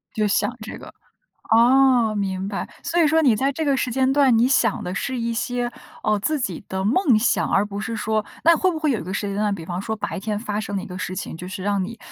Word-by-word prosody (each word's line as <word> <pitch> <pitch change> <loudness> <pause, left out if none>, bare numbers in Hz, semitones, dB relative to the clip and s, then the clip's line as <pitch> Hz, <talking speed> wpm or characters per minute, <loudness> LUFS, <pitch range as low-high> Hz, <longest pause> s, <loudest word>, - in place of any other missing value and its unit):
就 215 -1 +1
想 235 +4 0
这 220 - -7
个， - - -12 0.6
哦， 245 -1 +5
明 190 -1 -2
白。 200 - -4 0.2
所 340 0 +1
以 310 - +5
说， 320 +2 +3
你 250 -7 +4
在 270 +5 +1
这 315 +4 -3
个 280 -2 +2
时 255 - -1
间 265 +2 +2
段， 270 -5 +4
你 240 +2 +4
想 235 -5 +2
的 180 - -4
是 260 +5 -3
一 230 0 -1
些， 245 +1 -2 0.3
呃， 215 -1 +2
自 300 +8 -1
己 195 -6 -4
的 190 0 -3
梦 255 - +3
想， 240 - +1
而 200 +2 +2
不 200 0 -6
是 225 +2 -4
说 215 0 -1 0.2
那 335 +1 +6
会 375 - +2
不 320 - -4
会 305 -3 +1
有 230 - 0
一 - - -6
个 185 +2 -5
时 205 0 -2
间 200 - -3
段， 205 -1 0
比 165 -3 -9
方 180 +2 -4
说 220 +2 -3
白 205 - -4
天 210 0 -3
发 210 -2 -3
生 200 -1 -4
的 190 - -2
一 - - -7
个 185 -1 -7
事 185 0 -4
情， 160 - -5
就 180 - -8
是 190 0 -6
让 200 -2 0
你， 230 +5 -7
220 Hz, 290 characters per minute, -22 LUFS, 200-260 Hz, 0.6 s, 那